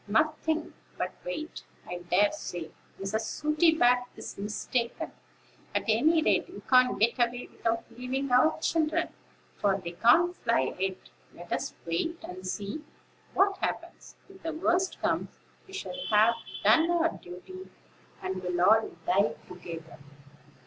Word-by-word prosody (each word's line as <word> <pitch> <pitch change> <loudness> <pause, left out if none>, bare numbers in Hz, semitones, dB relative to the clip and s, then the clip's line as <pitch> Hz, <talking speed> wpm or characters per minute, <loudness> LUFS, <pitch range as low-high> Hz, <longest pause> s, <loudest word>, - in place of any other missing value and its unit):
"Nothing, 310 +7 +1 0.2
but - - -2
wait. 335 -11 -5 0.3
I 175 - -4
dare 180 +4 +3
say, 175 - -6 0.3
Mrs. 195 +3 -1
Sooty 305 +7 +2
back 245 -2 +4
is - - -7
mistaken; 235 +4 -2 0.6
at - - +2
any 310 +9 +4
rate, - - +2
we - - -9
can't 255 -1 +4
get 235 +4 +3
away 240 +1 +1
without 230 0 -1
leaving 255 +2 -2
our 255 +7 +4
children, 320 +1 +1 0.5
for 200 -2 +2
they 170 -2 -6
can't 245 - +4
fly 230 -1 +1
yet. 190 0 0 0.4
Let 175 0 -6
us - - -2
wait, 170 - -1
and 185 +1 -7
see 205 +10 -4 0.5
what 390 0 +4
happens. - - -4
If 385 -1 -16
the 325 0 -3
worst 355 +3 +1
comes, - - -1 0.3
we 385 - -14
shall 385 - -5 0.2
have 215 +2 +6 0.3
done 325 +1 +5
our 335 -1 +3
duty, 370 - -10 0.5
and 185 0 -3
will 180 -1 -2
all 220 +5 +5 0.2
die 165 -6 +3
together." 170 -3 -9
240 Hz, 140 wpm, -29 LUFS, 190-315 Hz, 0.6 s, have